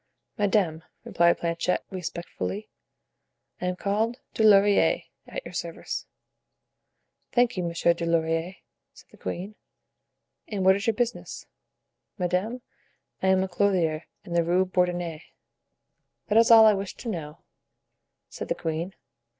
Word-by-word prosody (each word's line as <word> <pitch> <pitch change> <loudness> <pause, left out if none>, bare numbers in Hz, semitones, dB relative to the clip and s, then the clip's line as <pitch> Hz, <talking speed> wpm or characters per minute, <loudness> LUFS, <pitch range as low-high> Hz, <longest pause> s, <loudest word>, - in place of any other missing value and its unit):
"Madame," 195 -7 +1 0.2
replied 170 0 +3
Planchet, 170 +1 -1
respectfully, 185 +3 -5 0.9
"I 180 - -1
am 180 - -1
called 215 +5 -1 0.2
Dulaurier, 205 - +5 0.2
at - - -6
your - - -9
service." - - -5 1.3
"Thank 245 -1 +3
you, 185 - -1
Monsieur 170 0 +2
Dulaurier," 165 +1 0 0.4
said - - -17
the - - -17
queen; 180 - -5 0.9
"and 195 -3 -2
what 190 0 +7
is 200 +2 -3
your 225 - +2
business?" 240 0 -3 0.7
"Madame, 190 +7 -1 0.6
I 190 - +1
am 190 0 +4
a - - -2
clothier 175 -4 +1 0.2
in 170 - -6
the 170 0 +3
Rue 180 +3 +2
Bourdonnais." 175 -3 -1 1.1
"That 210 - +3
is 230 - +5
all 225 -1 +9
I 215 - +7
wished 195 -1 -4
to - - -7
know," 155 -7 -6 0.8
said - - -7
the - - -1
queen. 165 +3 -3
185 Hz, 130 wpm, -26 LUFS, 170-205 Hz, 1.3 s, all